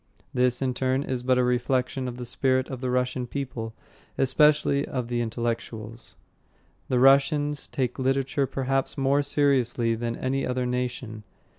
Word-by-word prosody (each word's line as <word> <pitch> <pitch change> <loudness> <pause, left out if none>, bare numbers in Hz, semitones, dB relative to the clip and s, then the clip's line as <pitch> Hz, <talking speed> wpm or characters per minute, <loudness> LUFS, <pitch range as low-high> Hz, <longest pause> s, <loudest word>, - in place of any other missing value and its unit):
This, 125 +1 +2
in 130 -1 0
turn, 130 +2 0
is 130 -3 -3
but 130 0 +2
a 125 - +3
reflection 125 +1 0
of 125 -1 -6
the 125 - -6
spirit 130 +1 +1
of 130 -2 -6
the 130 - -1
Russian 125 0 -1
people, 120 -4 -5 0.4
especially 145 +1 +3
of 125 -4 -4
the 120 -1 0
intellectuals. 115 -1 -4 0.7
The 125 - +2
Russians 140 +2 +3
take 125 -1 -2
literature 135 +1 0
perhaps 135 +1 -1
more 140 +1 +2
seriously 135 -5 +2
than 115 +1 -3
any 135 +2 -1
other 125 0 -1
nation. 125 -3 -3
130 Hz, 150 wpm, -26 LUFS, 120-135 Hz, 0.7 s, a